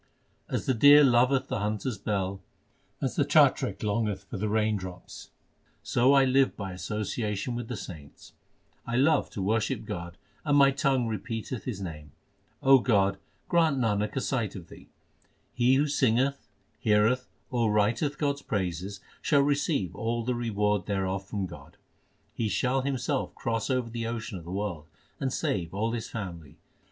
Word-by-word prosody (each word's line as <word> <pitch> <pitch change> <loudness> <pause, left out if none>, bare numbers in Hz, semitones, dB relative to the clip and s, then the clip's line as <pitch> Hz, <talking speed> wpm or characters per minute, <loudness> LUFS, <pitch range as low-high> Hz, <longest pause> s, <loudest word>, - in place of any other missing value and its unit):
As - - -2
the 130 - +2
deer 145 +5 +8
loveth 130 +1 +4
the - - -2
hunter 105 +4 -1
s 115 - -5
bell, 95 -1 -2 0.6
As - - -1
the - - +3
chatrik - - +3
longeth 105 -1 -1
for - - -7
the 105 +1 -1
rain 110 0 +2
drops, 95 -2 -8 0.5
So 125 +3 +3
I 135 -1 +6
live 135 +1 +3
by 100 -2 -5
association 105 +4 -3
with 120 -1 -4
the 125 - -4
saints. 75 -8 -10 0.5
I 120 - -2
love 140 +3 +3
to 95 - -4
worship 110 +2 0
God, 85 -5 -6 0.3
And 145 -1 +3
my 140 -1 +6
tongue 135 -3 +1
repeateth 115 +1 -4
His 115 -7 -4
name. 75 -6 -7 0.5
O 135 0 +7
God, 100 -5 +2 0.3
grant 165 -5 +3
Nanak 105 -4 0
a 135 - 0
sight 120 -7 -1
of 85 -4 -9
Thee. - - -14 0.6
He 125 +2 +3
who 140 +2 +3
singeth, 135 -1 +1 0.3
heareth, 115 +3 +2 0.2
or 120 -4 +1
writeth 115 +8 +1
God 140 -2 0
s - - -12
praises 95 - -3 0.2
Shall 145 -3 +3
receive 140 - 0
all 115 +2 -2
the 125 +2 0
reward 105 -5 0
thereof 95 -1 -2
from 100 -2 -2
God. 90 - -12 0.6
He 110 -2 -1
shall 130 +4 +1
himself 135 +1 -2
cross 115 -1 -2
over 125 -3 0
the 115 -1 -3
ocean 110 -4 -4
of 85 - -13
the 85 - -7
world, 95 -6 -4 0.3
And 135 -1 -1
save 90 -6 -2
all 110 +3 0
his 115 -1 -4
family. 85 -9 -7
115 Hz, 165 wpm, -28 LUFS, 100-130 Hz, 0.6 s, deer